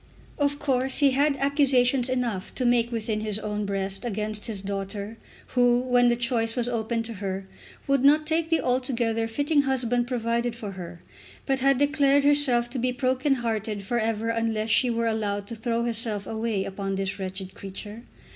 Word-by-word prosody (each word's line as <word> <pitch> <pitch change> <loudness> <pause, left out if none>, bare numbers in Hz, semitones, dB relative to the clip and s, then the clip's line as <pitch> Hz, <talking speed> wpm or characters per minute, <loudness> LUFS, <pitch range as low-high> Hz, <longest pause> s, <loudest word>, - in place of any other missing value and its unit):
Of 285 0 +1
course 265 -2 0
he 285 -2 +4
had 280 +2 +2
accusations 270 -2 +3
enough 240 -7 -2
to 255 - 0
make 240 -1 +2
within 220 -2 -2
his 215 -1 -2
own 210 -1 -3
breast 195 +1 -3
against 215 -1 -3
his 215 -4 -3
daughter, 200 +2 -5 0.3
who, 245 -1 +3
when 245 -1 +3
the 240 - +3
choice 235 -1 0
was 245 -2 -1
open 230 -1 -1
to 230 0 -6
her, 190 -1 -3 0.4
would 275 -1 +2
not 300 +2 +5
take 320 +1 0
the 325 - +2
altogether 240 -3 0
fitting 285 +6 +1
husband 245 -3 0
provided 235 -1 -1
for 210 -4 -6
her, 175 -2 -9 0.4
but 270 -1 +1
had 275 0 +3
declared 285 0 +3
herself 280 -5 +4
to 260 - -3
be 250 +1 +1
broken 260 +2 +1
hearted 215 -2 -2
for 240 +5 -1
ever 225 0 -1
unless 225 -1 -1
she 250 - +4
were 230 0 0
allowed 205 -3 -1
to 230 - -7
throw 230 +1 -1
herself 225 -3 -1
away 220 -3 -2
upon 195 0 -4
this 195 +1 -3
wretched 190 0 -6
creature. 205 +4 -8
235 Hz, 180 wpm, -26 LUFS, 215-255 Hz, 0.4 s, not